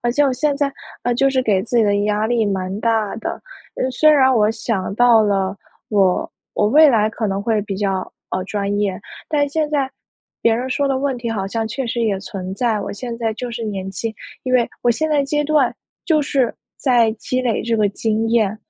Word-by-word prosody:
而 240 - 0
且 290 +4 +2
我 275 - +3
现 285 +2 0
在， 280 -1 0 0.3
呃， 245 - +1
就 275 +2 +3
是 260 -1 +1
给 195 -5 +2
自 240 - -2
己 230 - +5
的 205 -1 +2
压 210 +1 +1
力 230 -2 +1
蛮 190 +1 -2
大 225 -3 +1
的， - - -3 0.4
呃， 260 - -1
虽 310 +5 +3
然 265 -3 +5
我 215 -2 +3
想 215 -4 -2
到 235 -1 +5
了 195 -2 0 0.4
我 195 -3 +2 0.2
我 210 - +2
未 305 +7 +7
来 220 -4 +3
可 225 - -3
能 195 0 -2
会 220 -1 +1
比 200 -2 -5
较， 195 -2 -2 0.2
呃， 185 - -1
专 200 0 -2
业， 200 -2 0 0.3
但 290 -2 +2
现 305 +1 -1
在 275 -3 0 0.5
别 230 -1 +3
人 255 +3 -3
说 280 +2 +1
的 270 - +1
问 270 -2 -1
题 235 -1 -4
好 195 -3 -2
像 225 +1 -2
确 265 +4 -3
实 235 0 -2
也 210 -4 +1
存 190 -2 -6
在。 225 -2 0
我 - - -4
现 235 +2 -6
在 225 -2 -1
就 245 +2 -5
是 235 0 -5
年 195 -2 -4
轻， 220 +4 -4 0.3
因 255 - -2
为 240 -2 +4 0.2
我 240 - +4
现 315 +6 0
在 290 -2 +3
阶 295 +1 0
段 295 -4 +2 0.3
就 310 -3 +3
是 265 -4 0 0.2
在 240 -4 +3
积 255 +3 -3
累 235 -3 0
这 230 0 0
个 210 -2 +3
经 220 +2 -1
验， 220 -3 +2
230 Hz, 240 characters per minute, -20 LUFS, 205-260 Hz, 0.5 s, 未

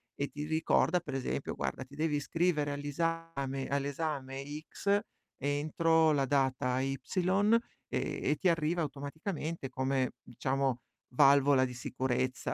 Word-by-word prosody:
e 140 - -1
ti 150 - -5
ricorda 160 +2 +2
per 150 -5 -7
esempio: 135 - -2
"Guarda 75 - -3
ti 140 +2 -14
devi 155 -1 +1
iscrivere 150 0 +1
agli 145 0 -4
esame 145 -4 -2
all'esame 140 -1 -2 0.3
X 200 +1 +1 0.4
entro 155 +3 +2
la 140 -1 +2
data 130 -2 +1
Y", 135 +1 -1 0.9
e - - -2
e - - +3
ti 190 - +2
arriva 165 +1 +1
automaticamente 150 +1 -4
come, 130 0 0 0.3
diciamo 135 -2 0 0.4
valvola 140 -1 +6
di 125 - -5
sicurezza 130 0 -1
140 Hz, 130 wpm, -32 LUFS, 135-160 Hz, 0.9 s, valvola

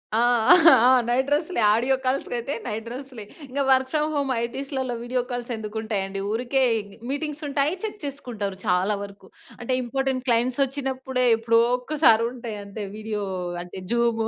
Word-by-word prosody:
ఆ! - - +3 0.5
ఆ! 250 0 +6 0.2
Night 255 +3 +1
డ్రెస్‌లె. 310 +5 0
Audio 255 +4 +2
కాల్స్‌కైయితే 255 0 -2
night 220 0 -4
డ్రెస్‌లే. 255 -2 -8 0.2
ఇంగా 275 +2 -1
work 260 0 +4
from 305 0 +1
home 280 -2 0
ఐటీస్‌లలో 265 +1 -3
video 250 +1 -1
calls 245 0 -4
ఎందుకుంటాయండి? 210 -3 -4
ఊరికే 250 +4 0 0.5
మీటింగ్స్ 300 +1 -3
ఉంటాయి. 285 +3 +1
చెక్ 425 -1 -5
చేసుకుంటారు 235 -9 -5
చాలా 185 +3 +2
వరకు. 200 0 -11 0.3
అంటే, 240 +2 -2
ఇంపార్టెంట్ 265 +1 -1
క్లయింట్స్ 245 +2 +1
వచ్చినప్పుడే 265 -1 -2
ఎప్పుడో 230 0 +3 0.2
ఒక్కసారి 250 -4 +3
ఉంటాయి 235 -4 -7
అంతే. 200 +1 -7
వీడియో 215 -1 -4 0.4
అంటే 180 +2 -9
జూము 235 -2 +1
245 Hz, 145 wpm, -24 LUFS, 225-270 Hz, 0.5 s, ఆ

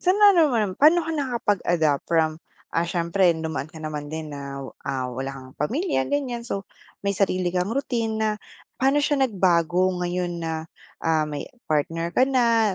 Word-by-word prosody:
Sa 365 - +3
ano 390 -7 +6
naman, 215 -7 0
pa'no 320 +3 +6
ka 325 - -3
nakapag-adapt 200 - +1
from, 160 -1 +1 0.3
ah, 170 +1 0
siyempre 175 +2 +2
dumaan 160 -2 -3
ka 160 - -15
naman 150 -2 -5
din 155 -1 -5
na, 140 -1 -6 0.2
ah, 130 -2 -2
wala 135 +2 -4
kang 130 -1 -10
pamilya 250 - 0
ganiyan, 260 -5 -1
so 200 -4 -4 0.4
may 200 - +2
sarili 185 -3 0
kang 180 +1 0
routine 230 -3 -1
na, 220 0 +1 0.5
pa'no 270 +2 +4
siya 290 -3 +1
nagbago 180 -2 +2
ngayon 175 -1 -2
na, 160 -1 -3 0.4
ah, 155 -2 +2
may 145 -1 -4 0.2
partner 165 +2 0
ka 255 - +6
na, 230 -6 +3
180 Hz, 165 wpm, -24 LUFS, 160-235 Hz, 0.5 s, ano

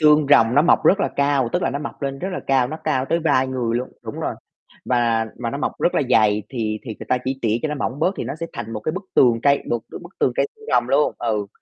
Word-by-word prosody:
xương 150 -1 +5
rồng 115 -3 +5
nó 145 - +5
mọc - - +3
rất 195 - +5
là - - +1
cao, 140 -3 +2
tức - - 0
là - - +1
nó 140 - -3
mọc 145 0 -7
lên 135 0 -3
rất 190 - -3
là - - -3
cao, 130 -2 +3
nó 155 - -5
cao 135 -4 +1
tới 165 - 0
vai 135 -5 +2
người 120 -3 -1
luôn 125 +1 -3
đúng - - -7
rồi, - - -2 0.5
và 115 -2 +1
và 120 -1 -3
nó 140 - -4
mọc - - -1
rất 175 - +2
là - - +2
dày 105 -2 +4
thì 110 -4 -3
thì 110 - -6
người - - -9
ta 125 - +2
chỉ 135 +1 -2
tỉa 110 0 +2
cho 155 - 0
nó 150 - -2
mỏng 140 0 -3
bớt 185 +5 +1
thì - - -3
nó - - -4
sẽ 165 - -2
thành 115 -1 -6
một 110 - -4
cái 155 - -2
bức 190 +2 -5
tường 120 -3 +4
cây 140 0 +3
một 120 - +1
bức 175 +2 -11
tường 125 - +3
cây 140 - +2
xương - - -16
rồng 120 -1 +3
luôn 145 +3 +2
ừ, 105 -4 -1
130 Hz, 295 wpm, -21 LUFS, 115-150 Hz, 0.5 s, xương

